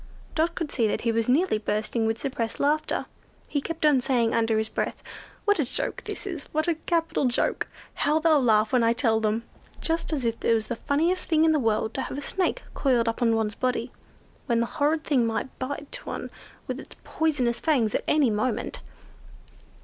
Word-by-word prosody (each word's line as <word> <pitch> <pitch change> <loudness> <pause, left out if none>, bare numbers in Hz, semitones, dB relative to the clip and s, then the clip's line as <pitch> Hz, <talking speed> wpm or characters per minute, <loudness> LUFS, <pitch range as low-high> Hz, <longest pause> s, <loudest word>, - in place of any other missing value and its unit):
Dot 330 +2 +1
could 330 -4 -3
see 230 -4 +2
that - - -1
he 230 - +1
was 230 +1 0
nearly 275 - +3
bursting 215 +2 -1
with 225 0 0
suppressed 230 -4 -3
laughter. 300 +2 +1 0.4
He 285 - -1
kept 330 +1 -3
on 290 -4 +5
saying, 240 -3 +1
under 225 -1 +2
his 220 0 0
breath, - - -3 0.4
"what 410 -3 +3
a - - +4
joke 250 - -2
this 415 -2 -5
is! 345 -7 -5
What 310 +2 -1
a 340 - +3
capital 330 -2 0
joke! 245 -1 0 0.3
How 300 +1 +1
they'll 320 +1 +3
all 300 -2 +5
laugh 220 -1 +3
when 250 - +5
I 230 0 +4
tell 230 -3 +2
them." 220 +1 0 0.4
Just 330 0 -1
as 280 -6 -1
if 230 0 -2
it 230 - +4
was 220 -1 -2
the 240 - -1
funniest 325 +9 0
thing 320 -1 +4
in 320 - +5
the 310 - +3
world 220 -2 0
to 265 - -2
have - - -5
a - - -3
Snake 375 +4 -1
coiled 245 -4 +2
up 230 - -1
on 230 -2 +4
one's 220 -1 0
body—when 250 0 -3
the 235 - +2
horrid 300 +5 0
thing 270 -6 +2
might 225 +3 -3
bite 285 - -4
one - - -5 0.3
with - - -4
its - - -11
poisonous 260 -7 0
fangs, 245 -9 +2
at - - 0
any 290 -6 +4
moment! 215 +5 -1
255 Hz, 205 wpm, -26 LUFS, 230-310 Hz, 0.4 s, on